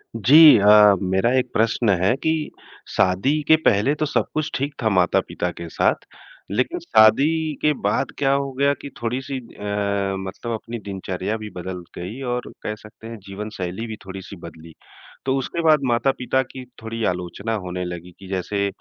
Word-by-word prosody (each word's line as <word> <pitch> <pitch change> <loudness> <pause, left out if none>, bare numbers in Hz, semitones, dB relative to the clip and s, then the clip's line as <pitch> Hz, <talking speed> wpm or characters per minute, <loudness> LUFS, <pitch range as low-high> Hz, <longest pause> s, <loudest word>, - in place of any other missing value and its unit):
जी 145 +4 +8
अ, 105 0 +7
मेरा 95 +5 +1
एक 125 -1 -3
प्रश्न 115 0 +1
है 100 +7 +3
कि 160 - +2 0.6
शादी 115 +12 +2
के 160 - +7
पहले 110 +7 +3
तो 155 - -1
सब 150 - 0
कुछ 155 0 -1
ठीक 140 +2 -2
था 110 - +3
माता-पिता 90 -1 +1
के 85 0 -8
साथ, - - +2 0.6
लेकिन - - -1
शादी 150 +9 +3
के 150 - +3
बाद 100 - 0
क्या 135 -1 +2
हो 140 0 -1
गया 140 +2 +2
कि 140 - -7
थोड़ी-सी 130 +4 -3
अ, 115 -4 -13 0.6
मतलब 100 +5 -6
अपनी 115 +1 -6
दिनचर्या 95 0 -4
भी 110 -1 -7
बदल 90 0 -6
गई, 100 +10 -6
और 125 -1 -3
कह 105 - -3
सकते 110 +1 -14
हैं 115 0 -7
जीवनशैली 100 0 -5
भी 110 - -5
थोड़ी-सी 95 +1 -8
बदली। 80 0 -13 0.5
तो 135 0 +1
उसके 135 +5 -3
बाद 155 -2 +5
माता-पिता 125 +1 +1
की 130 0 -10 0.2
थोड़ी 115 0 -5
आलोचना 90 +5 -3
होने 90 0 -4
लगी 90 0 -7
कि 95 - -11
जैसे 100 +2 -1
110 Hz, 170 wpm, -22 LUFS, 95-130 Hz, 0.6 s, जी